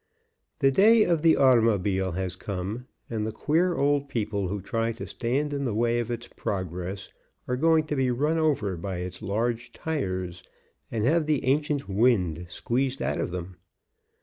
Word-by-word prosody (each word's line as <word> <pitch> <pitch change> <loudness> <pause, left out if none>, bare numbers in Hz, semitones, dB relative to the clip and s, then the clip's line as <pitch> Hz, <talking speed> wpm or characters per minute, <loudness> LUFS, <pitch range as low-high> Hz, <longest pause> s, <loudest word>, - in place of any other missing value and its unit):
The 135 - +5
day 215 +8 +6
of 170 -5 +1
the 165 0 +5
automobile 105 -8 +3
has 95 0 -3
come, 100 +6 -5 0.2
and 110 -2 -3
the 110 - -2
queer 165 +10 +1
old 140 0 +1
people 105 -4 -1
who 100 +3 -3
try 115 +4 -1
to 115 - -7
stand 135 +5 -1
in 140 -1 -2
the 120 -6 -1
way 120 +1 +2
of 120 - -3
its 120 0 -4
progress 95 0 -4 0.4
are 125 - 0
going 160 +3 +3
to 150 - -2
be 130 -2 +1
run 150 +7 +1
over 135 - +1
by 95 +1 -4
its 90 +2 -6
large 115 +3 -2
tires 95 - -3 0.5
and 110 -2 -1
have 155 +3 +2
the 150 -5 +1
ancient 145 +1 +1
wind 95 -6 +2
squeezed 130 +7 -1
out - - -1
of - - -2
them. 90 0 -6
115 Hz, 175 wpm, -26 LUFS, 95-140 Hz, 0.5 s, day